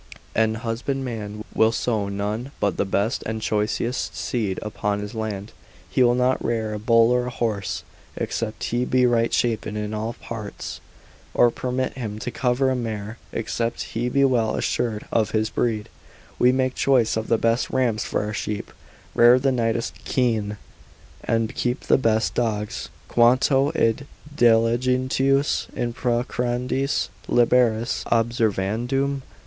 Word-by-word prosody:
An 110 0 +2
husbandman 115 -2 -4
will 110 0 +4
sow 110 -3 -1
none 105 +6 -3
but 100 -4 0
the - - +1
best 100 +4 0
and 110 0 -2
choicest 110 +3 -1
seed 105 -6 -2
upon 105 -1 -2
his 105 +1 -6
land, 110 -2 -4 0.4
he - - +2
will 120 -1 +5
not 125 +1 +1
rear 110 -2 -1
a 105 - -4
bull 115 +1 +4
or 125 0 +1
a - - -1
horse, 110 -5 -2 0.3
except 110 -2 -3
he 120 +1 0
be 125 0 +3
right 115 -1 +2
shapen 110 -3 0
in 105 0 -3
all 110 +2 -2
parts, 110 -4 -7 0.5
or 120 - +5
permit 130 +2 -2
him 110 -5 -5
to 110 +3 -4
cover 125 +2 +1
a - - +1
mare, 110 -2 -4
except 115 +1 -2
he 120 +2 -1
be 140 +2 +3
well 120 -4 +2
assured 110 -3 -1
of 110 -3 +2
his 110 0 0
breed; 110 -3 -1 0.5
we 125 - +6
make 130 0 +1
choice 125 -5 +2
of 110 0 -2
the 115 - +3
best 115 +2 +1
rams 120 -5 +1
for - - -1
our 105 0 -4
sheep, 105 0 -4 0.4
rear 120 +1 +7
the 135 +1 +2
neatest 115 -2 -1
kine, 110 -5 0 0.7
and 115 -1 0
keep 125 +1 -1
the - - +3
best 110 -3 +1
dogs, 105 -3 -2 0.2
Quanto 130 +4 +4
id 115 +3 +1 0.3
diligentius 130 +3 +2
in 120 -1 -2
procreandis 125 +2 -1 0.2
liberis 120 -1 +3
observandum? 120 +4 0
115 Hz, 145 wpm, -23 LUFS, 110-125 Hz, 0.7 s, rear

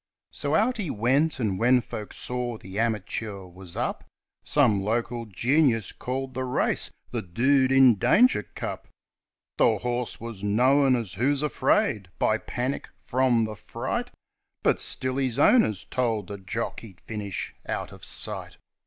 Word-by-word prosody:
So 145 +1 -1
out 245 +3 +2
he 195 -7 -3
went; 135 +7 +1
and, 105 -6 -1
when 125 +2 +5
folk 105 -3 -7
saw 125 -2 -2
the 95 0 -7
amateur 105 -3 -2
was 90 -1 -10
up, - - -2 0.4
Some 120 -9 +3
local 115 +2 -2
genius 115 - +2
called 130 +1 -4
the 130 +1 -2
race 125 0 0 0.2
"the 120 - -2
Dude 130 +8 +2
in 130 -6 +6
Danger 245 - +5
Cup". - - -7 0.7
The 110 -2 +4
horse 120 +2 -2
was 115 -3 -7
known 130 +6 +4
as 115 -6 -3
"Who's 140 +7 +1
Afraid", 145 - +1
by 110 0 +2
"Panic" 125 +5 -3
from 125 -2 +2
"The 110 0 -6
Fright" - - -4 0.3
— - - -52
But - - +3
still 130 0 -2
his 130 -3 -1
owners 140 - +4
told 115 -6 -1
the 100 -1 -6
jock 105 +5 -4
he'd 100 -6 -13
finish 105 -3 -4
out - - -3
of - - -14
sight. - - -2
120 Hz, 155 wpm, -26 LUFS, 105-130 Hz, 0.7 s, in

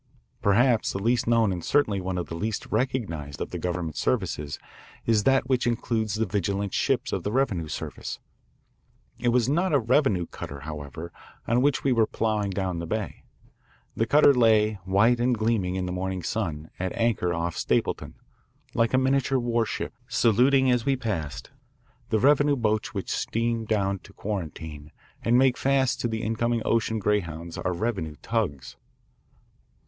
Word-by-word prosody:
Perhaps 115 +3 +3
the - - -2
least 115 +5 +1
known 115 -4 +3
and 85 -2 -5
certainly 105 -10 +2
one 90 0 -3
of 90 - -2
the - - -8
least 105 +6 -3
recognised 105 - -2
of - - -4
the - - -4
government 85 -3 -3
services 70 -1 -1 0.5
is 110 -2 +2
that 135 -1 +3
which 125 -2 +1
includes 110 -2 -1
the 110 +1 +1
vigilant 100 0 -2
ships - - 0
of - - -1
the 105 - -3
revenue 105 - 0
service. - - -5 1.0
It - - -1
was 120 -1 +3
not 170 +5 +1
a - - +5
revenue 120 - +2
cutter, 70 -3 -8
however, 75 +2 -7 0.4
on 120 +2 +3
which 140 +1 +2
we 135 - +2
were 115 -3 +3
ploughing 105 -2 -1
down 95 -2 -2
the 85 - -5
bay. 110 +3 -4 0.7
The 115 - 0
cutter 145 +1 +6
lay, 110 -4 +3
white 105 +6 +3
and 120 0 +2
gleaming 110 -5 0
in 95 -1 -1
the 90 - -3
morning 95 0 -3
sun, 80 -9 -3
at 95 0 -2
anchor 115 -6 +1
off 85 0 -2
Stapleton, - - -1 0.6
like 115 +2 +2
a - - +5
miniature 135 0 +2
warship, 120 -2 -1
saluting 125 +2 +4
as 125 -2 +2
we 135 +2 +2
passed. 85 - -4 0.6
The 110 - +2
revenue 145 +4 +4
boats 115 0 0
which 100 -4 -4
steam 115 0 -1
down 100 -3 0
to 100 - -17
Quarantine 80 -7 -6 0.3
and 120 +1 +3
make 130 -1 +4
fast 135 -2 +1
to - - 0
the 110 0 -3
incoming 115 +1 0
ocean 115 -1 +1
greyhounds 85 -6 -1
are 90 - -2
revenue 90 -5 -2
tugs. 100 - -2
110 Hz, 165 wpm, -26 LUFS, 90-120 Hz, 1.0 s, cutter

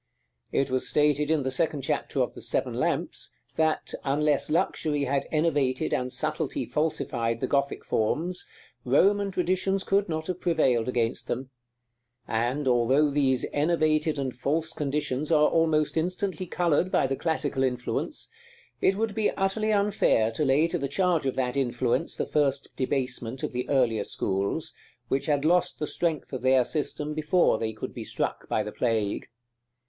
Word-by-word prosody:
It 135 -1 0
was 130 0 0
stated 150 0 +2
in 160 -3 +2
the 130 - -1
second 145 0 0
chapter - - -1
of - - -4
the - - -10
"Seven - - -1
Lamps," - - -2 0.2
that, 160 -1 0
unless 145 +1 +1
luxury 150 -2 0
had 140 0 0
enervated 145 -5 +1
and 125 0 -1
subtlety 125 - -2
falsified 120 -7 -1
the - - 0
Gothic 140 0 -1
forms, 165 +11 -1 0.4
Roman 200 +10 +3
traditions 185 +1 0
could 200 -1 +1
not 160 -1 -2
have 180 0 -4
prevailed 130 -9 +2
against 120 -2 -1
them; 130 +2 -4 0.8
and, 125 +5 -1
although 130 +4 +3
these 135 -3 +2
enervated 155 0 +2
and 135 -2 -3
false 155 +6 -1
conditions 145 0 -2
are 150 -1 +5
almost 160 -2 +2
instantly 185 +2 -1
colored 175 +1 +1
by - - +3
the 135 0 -1
classical 150 -3 -1
influence, 125 -2 -2 0.5
it 190 - +3
would 220 0 -1
be 215 0 +1
utterly 215 +3 0
unfair 200 - +2
to 115 - -2
lay 145 +4 +3
to - - -1
the 140 - -1
charge 170 -1 +1
of 130 - -1
that 125 -1 -1
influence 125 +3 0
the - - -1
first 140 -2 0
debasement 130 -2 -2
of - - -2
the 125 0 -4
earlier 120 -6 +2
schools, 100 - -2 0.4
which 135 - 0
had 145 -1 +1
lost 175 +2 +2
the 150 - -2
strength 160 -3 -2
of 130 - -3
their 130 -1 +4
system 150 0 -3
before 155 -4 +2
they 110 -1 -1
could 110 - -7
be - - -6
struck - - -3
by 110 - +1
the 105 - -6
plague. 110 -4 -1
145 Hz, 165 wpm, -27 LUFS, 130-165 Hz, 0.8 s, are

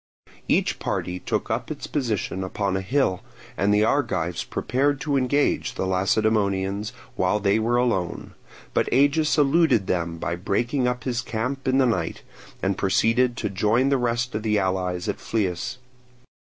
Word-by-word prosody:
Each - - +1
party 90 0 -3
took - - -2
up - - -2
its - - -5
position 110 -8 -2
upon 95 +1 -2
a 95 - -1
hill, 95 -3 +1 0.3
and 100 +2 +1
the 105 +1 +4
Argives 90 - 0
prepared 140 +2 0
to 145 -2 0
engage 135 +2 +1
the - - -2
Lacedaemonians 100 +1 +1 0.2
while 95 +3 +1
they 100 +1 +2
were 115 +2 +1
alone; 115 -8 -1 0.4
but - - +1
Agis 145 +5 +3
eluded 145 - +4
them 85 -2 -1
by 85 +1 -2
breaking 120 +8 0
up 125 -1 -2
his 125 -2 -1
camp 125 +3 -3
in 130 0 +3
the 135 - +4
night, 90 -9 -1 0.4
and 95 0 0
proceeded 115 +5 +2
to - - -1
join 110 +7 +2
the 140 - +3
rest 120 0 -1
of 110 - -2
the 105 -1 +1
allies 90 -1 -1
at 105 - -2
Phlius. 110 +4 -2
110 Hz, 160 wpm, -24 LUFS, 95-125 Hz, 0.4 s, the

